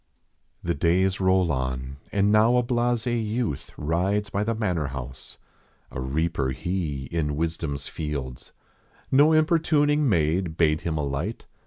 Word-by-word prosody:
The - - 0
days 90 +5 +2
roll 95 -2 +3
on 65 0 -3
and 100 0 +2
now 110 +3 +5
a 125 - +3
blase 120 -1 0
youth 115 - -2
Rides 95 +7 0
by 100 0 0
the 115 +2 -1
manor 90 -9 -1
house. 65 -1 -8 0.5
A 65 - -5
reaper 70 +1 -1
he 75 0 -3
In 75 -3 -1
wisdom 80 -2 -2
s 70 - -7
fields. 70 -5 -5 0.6
No 145 +4 +6
importuning 155 -3 +3
maid 85 -1 +1
Bade 80 -1 +2
him 80 -2 -2
alight. 75 +9 -3
85 Hz, 140 wpm, -25 LUFS, 75-110 Hz, 0.6 s, No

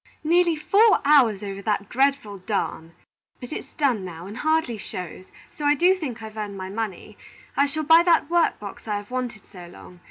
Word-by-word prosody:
"Nearly 340 +1 +3
four 405 +7 +4
hours 250 -9 +4
over 200 -1 -6
that 205 -1 -1
dreadful 265 -6 0
darn! 180 -4 -3 0.5
But 245 +3 -8
it's - - -7
done 255 -9 +1
now, 175 -2 -8
and 200 +3 -8
hardly 315 -8 0
shows, 185 -1 -8 0.2
so 300 - -9
I 290 0 +4
do 355 +5 +4
think 265 -11 -6
I've 220 0 -9
earned 205 -2 -5
my 190 0 -6
money. 210 -3 -6 0.4
I 280 - +3
shall 310 +2 -3
buy 325 +2 +7
that 345 -4 +3
work 340 +1 +1
box 205 +2 -10
I 210 - -1
have 205 +3 -9
wanted 245 -4 -4
so 180 -3 -12
long. 180 0 -14
230 Hz, 195 wpm, -24 LUFS, 200-305 Hz, 0.5 s, buy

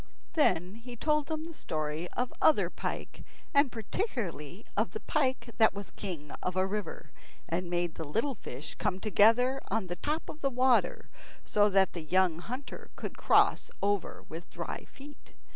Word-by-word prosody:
Then 185 - +3
he 240 +1 -9
told 300 +3 +1
them 315 -1 -2
the 330 +1 -7
story 155 - -3
of 250 0 0
other 315 - +5
pike, - - -5 0.3
and 280 -2 +5
particularly 220 - -3
of - - +1
the 435 - -3
pike 260 -5 0
that 220 -2 +6
was 200 -1 -6
king 160 -7 -6
of 180 - -2
a 185 0 +3
river, 195 -6 -4 0.4
and 175 +1 -2
made 175 -1 0
the 160 - -5
little 225 - 0
fish 145 - -7
come 185 - -1
together 230 +6 +4
on 215 0 0
the 175 0 -5
top 305 - -2
of 310 - -8
the 275 - +2
water 255 0 +3 0.4
so 205 0 +4
that 195 -1 +4
the 170 - -4
young 175 +1 +2
hunter 255 +9 -7
could - - -5
cross - - +4
over 200 -2 0
with 165 +2 -8
dry - - -5
feet. 290 +1 -14
210 Hz, 170 wpm, -31 LUFS, 175-265 Hz, 0.4 s, that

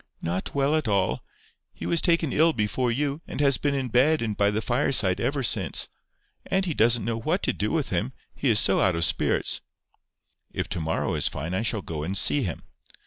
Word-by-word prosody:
"Not 90 +9 -3
well 140 +2 +2
at 155 -5 -1
all. 100 -3 0 0.5
He - - -7
was 170 - 0
taken 170 -5 +1
ill 160 +1 +4
before 115 +3 -1
you, 140 +5 -2
and - - -6
has 140 -2 +3
been 145 -1 0
in 135 -2 -2
bed 135 +5 +3
and 110 -2 -2
by 100 0 +2
the 105 +1 -1
fireside 110 -6 +2
ever 140 -1 -1
since. 100 -7 +2 0.6
Auntie 190 -3 0
doesn't 115 -1 +2
know 115 0 -2
what 160 - -1
to - - +1
do 105 - -2
with 155 -5 -1
him, 100 +8 -1 0.2
he 140 - -1
is 110 -2 +4
so 95 - +2
out 95 -4 +2
of 85 -1 +3
spirits." - - 0 0.9
"If - - -3
to - - -3
morrow 80 0 -2
is - - +1
fine, 80 +5 -4
I 95 - 0
shall 110 -3 -1
go 80 -2 -5
and 95 +6 -2
see 145 - +3
him." 90 - -4
115 Hz, 210 wpm, -25 LUFS, 100-145 Hz, 0.9 s, ill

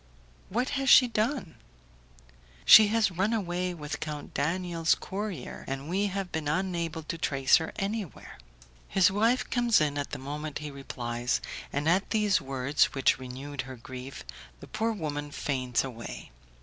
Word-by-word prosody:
"What 245 +7 0
has 270 - +1
she 250 - +9
done?" 230 - -1 1.1
"She 215 - +10
has 220 -1 +2
run 190 +6 0
away 180 -4 -1
with 150 -2 -5
Count 150 -1 -6
Daniel's 165 +2 +1
courier, 195 -7 -5
and 135 +1 -4
we 195 +3 +1
have 195 -1 -4
been 160 -2 -3
unable 170 -1 -1
to 165 +2 -5
trace 135 -4 +4
her 160 - -4
anywhere." 195 - -5 0.5
His 190 -1 +4
wife 225 +5 +2
comes 240 -2 +4
in 145 -2 0
at 145 - -3
the - - -5
moment 150 +3 -5
he 150 -1 -6
replies, 120 -3 -3 0.3
and 145 +2 -1
at 185 +4 +2
these 210 -4 +2
words, 135 +1 +1
which 135 -1 +3
renewed 130 +2 -6
her 130 0 -9
grief, 130 +2 -9 0.4
the - - -10
poor 225 +1 -1
woman 150 -7 -4
faints 130 -4 -1
away. 115 - -8
160 Hz, 155 wpm, -28 LUFS, 140-195 Hz, 1.1 s, She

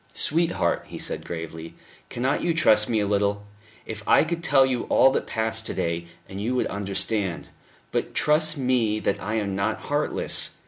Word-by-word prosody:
"Sweetheart," 165 +2 +1
he - - -8
said - - -3
gravely, 80 -1 -7 0.3
"cannot 130 +4 -1
you 170 -2 0
trust 110 -9 +4
me 115 -2 +1
a - - 0
little? 100 0 0 0.4
If 110 -1 -7
I - - +5
could 165 +1 -4
tell 135 -5 +5
you 125 -2 -2
all 135 - +4
that - - -2
passed 110 0 -1
to - - -5
day, 85 0 -2 0.2
you 105 +6 -3
would 125 - +1
understand. 100 -1 -2 0.4
But - - -3
trust 155 +1 +4
me 125 -5 +1
that 100 - -2
I 105 +2 -3
am 100 -3 -2
not 100 +3 -1
heartless. 145 +1 0
110 Hz, 175 wpm, -24 LUFS, 100-135 Hz, 0.4 s, I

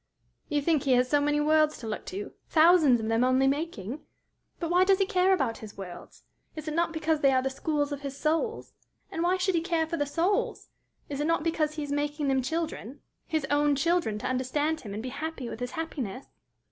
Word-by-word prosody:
"You 295 -2 0
think 315 -2 +2
he 275 -3 +2
has 250 0 +3
so 290 +2 +2
many 295 0 +1
worlds 305 0 +3
to 235 - -9
look 215 - -5
to 195 +2 -5 0.2
thousands 315 -6 +5
of 220 - -3
them 225 +2 +2
only 255 +1 +3
making? 280 - -2 0.6
But 335 -1 -2
why 360 +1 +5
does 385 0 +4
he 390 - +2
care 375 -2 +2
about 270 -11 +1
his 215 -2 -10
worlds? 180 -3 -10 0.3
Is 310 0 -7
it 310 - -2
not 335 +1 +1
because 315 -1 0
they 275 - +4
are 260 -1 +2
the 265 - -1
schools 295 +1 -1
of 285 -1 -4
his 280 -1 -6
souls? 330 +11 -1 0.4
And 330 - -3
why 355 +2 +2
should 370 +1 +1
he 335 - +2
care 335 -2 0
for 335 +1 -3
the 290 -1 0
souls? 345 +7 0 0.4
Is 285 -1 -5
it 300 - 0
not 330 -2 +1
because 310 -2 0
he 305 - -3
is 285 - -5
making 290 0 -1
them 265 -1 +2
children 290 -3 -4 0.3
his 315 -3 -1
own 290 0 +3
children 330 -7 +1
to 210 - -4
understand 290 +5 -1
him 200 -3 -7
and 215 - -5
be 255 - -4
happy 280 -1 -5
with - - -7
his 245 0 -4
happiness?" 275 - -4
295 Hz, 225 wpm, -28 LUFS, 260-325 Hz, 0.6 s, thousands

